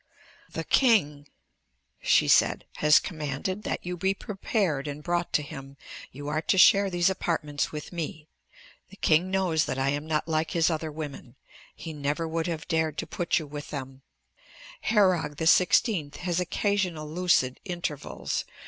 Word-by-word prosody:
"The -, -, -4 dB
king," 150 Hz, -, +3 dB, 0.7 s
she -, -, +4 dB
said, -, -, +4 dB
"has 150 Hz, 0 st, +6 dB
commanded 155 Hz, +4 st, -3 dB
that -, -, -4 dB
you 180 Hz, 0 st, -3 dB
be 190 Hz, +3 st, 0 dB
prepared 190 Hz, -, -2 dB
and 145 Hz, +1 st, -6 dB
brought 175 Hz, 0 st, -1 dB
to 150 Hz, -, +2 dB
him. 135 Hz, 0 st, -10 dB, 0.3 s
You 145 Hz, +2 st, -8 dB
are 155 Hz, +1 st, -1 dB
to 190 Hz, -, +1 dB
share 200 Hz, +1 st, +6 dB
these 175 Hz, -1 st, +2 dB
apartments 150 Hz, -5 st, -2 dB
with 150 Hz, +3 st, -7 dB
me. 155 Hz, -2 st, -5 dB, 0.6 s
The 195 Hz, -, -14 dB
king 170 Hz, -1 st, +2 dB
knows 180 Hz, -5 st, +1 dB
that 130 Hz, -, -3 dB
I 135 Hz, +1 st, +1 dB
am 145 Hz, +2 st, -2 dB
not 155 Hz, 0 st, -1 dB
like 160 Hz, 0 st, 0 dB
his 165 Hz, +1 st, +3 dB
other 160 Hz, -1 st, -3 dB
women. 145 Hz, -5 st, -8 dB, 0.4 s
He 165 Hz, -, -7 dB
never 150 Hz, +2 st, -2 dB
would 160 Hz, +1 st, -2 dB
have 160 Hz, -3 st, -4 dB
dared 160 Hz, -3 st, 0 dB
to -, -, -2 dB
put 175 Hz, -, -1 dB
you 160 Hz, -, -2 dB
with 145 Hz, 0 st, -8 dB
them. 135 Hz, -2 st, -7 dB, 0.8 s
Herog 185 Hz, -9 st, +2 dB
XVI 165 Hz, -, +3 dB
has 175 Hz, -1 st, -2 dB
occasional 180 Hz, -3 st, -1 dB
lucid 155 Hz, -6 st, +1 dB
intervals. 170 Hz, -6 st, -4 dB
160 Hz, 155 wpm, -27 LUFS, 150-180 Hz, 0.8 s, has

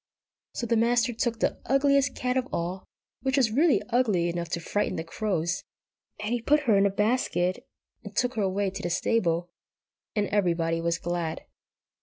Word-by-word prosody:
So 240 Hz, -, -2 dB
the 230 Hz, 0 st, +1 dB
Master 240 Hz, +1 st, +2 dB
took 230 Hz, 0 st, -1 dB
the -, -, 0 dB
ugliest 280 Hz, 0 st, +3 dB
cat 250 Hz, 0 st, -1 dB
of 260 Hz, -1 st, 0 dB
all, 180 Hz, +3 st, -3 dB, 0.4 s
which 265 Hz, +1 st, 0 dB
was 245 Hz, -5 st, +3 dB
really 295 Hz, +6 st, +3 dB
ugly 210 Hz, -9 st, +2 dB
enough 170 Hz, -1 st, -3 dB
to 170 Hz, -, -2 dB
frighten 205 Hz, +5 st, -1 dB
the 160 Hz, -, -3 dB
crows, 175 Hz, -1 st, -1 dB, 0.6 s
and 210 Hz, +3 st, -2 dB
he 240 Hz, -, -1 dB
put 300 Hz, +5 st, +3 dB
her 235 Hz, -8 st, +3 dB
in 200 Hz, 0 st, +5 dB
a -, -, +1 dB
basket, 200 Hz, -3 st, 0 dB, 0.4 s
and -, -, -10 dB
took 250 Hz, 0 st, +1 dB
her 220 Hz, -, -1 dB
away 195 Hz, 0 st, 0 dB
to 195 Hz, +1 st, -6 dB
the 175 Hz, -, -2 dB
stable, 175 Hz, -2 st, 0 dB, 0.6 s
and 210 Hz, -1 st, +2 dB
everybody 170 Hz, -4 st, +1 dB
was 170 Hz, 0 st, 0 dB
glad. 170 Hz, -2 st, -3 dB
205 Hz, 180 wpm, -27 LUFS, 175-245 Hz, 0.6 s, in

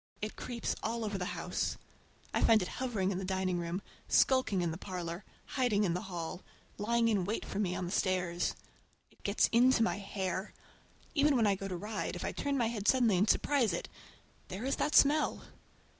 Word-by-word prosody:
It 215 Hz, +1 st, -4 dB
creeps 240 Hz, -2 st, -3 dB
all 225 Hz, 0 st, -2 dB
over 205 Hz, -2 st, -3 dB
the 180 Hz, -, -3 dB
house. -, -, -2 dB, 0.6 s
I -, -, +1 dB
find 220 Hz, -4 st, +5 dB
it -, -, -4 dB
hovering 215 Hz, -7 st, 0 dB
in 185 Hz, -, -2 dB
the -, -, -4 dB
dining 185 Hz, -1 st, -1 dB
room, 170 Hz, +3 st, -3 dB, 0.2 s
skulking 260 Hz, -9 st, +3 dB
in 170 Hz, -, 0 dB
the 160 Hz, -, -5 dB
parlor, 180 Hz, -1 st, -5 dB, 0.2 s
hiding 245 Hz, -6 st, +1 dB
in 175 Hz, -4 st, +1 dB
the 180 Hz, -, -2 dB
hall, 175 Hz, 0 st, -5 dB, 0.4 s
lying 230 Hz, +2 st, +2 dB
in 205 Hz, -5 st, +2 dB
wait 210 Hz, +5 st, -2 dB
for 195 Hz, -, -4 dB
me 180 Hz, -4 st, 0 dB
on 180 Hz, -, -2 dB
the 175 Hz, -, -5 dB
stairs. 180 Hz, -3 st, 0 dB, 0.6 s
It -, -, -26 dB
gets 200 Hz, +1 st, +2 dB
into 240 Hz, 0 st, +5 dB
my 225 Hz, -, 0 dB
hair. 195 Hz, -1 st, -3 dB, 0.6 s
Even 290 Hz, -2 st, +4 dB
when 235 Hz, -3 st, +3 dB
I 205 Hz, -, +4 dB
go 195 Hz, 0 st, -4 dB
to 185 Hz, -2 st, -4 dB
ride, 210 Hz, +5 st, -4 dB
if -, -, -4 dB
I -, -, -1 dB
turn 280 Hz, -1 st, -1 dB
my 240 Hz, -, +2 dB
head 220 Hz, -3 st, -3 dB
suddenly 240 Hz, -6 st, +4 dB
and 200 Hz, +4 st, +2 dB
surprise 255 Hz, -10 st, +2 dB
it—there 190 Hz, +4 st, -9 dB
is 275 Hz, -, 0 dB
that 300 Hz, -, 0 dB
smell! 300 Hz, +2 st, +4 dB
205 Hz, 200 wpm, -32 LUFS, 185-235 Hz, 0.6 s, find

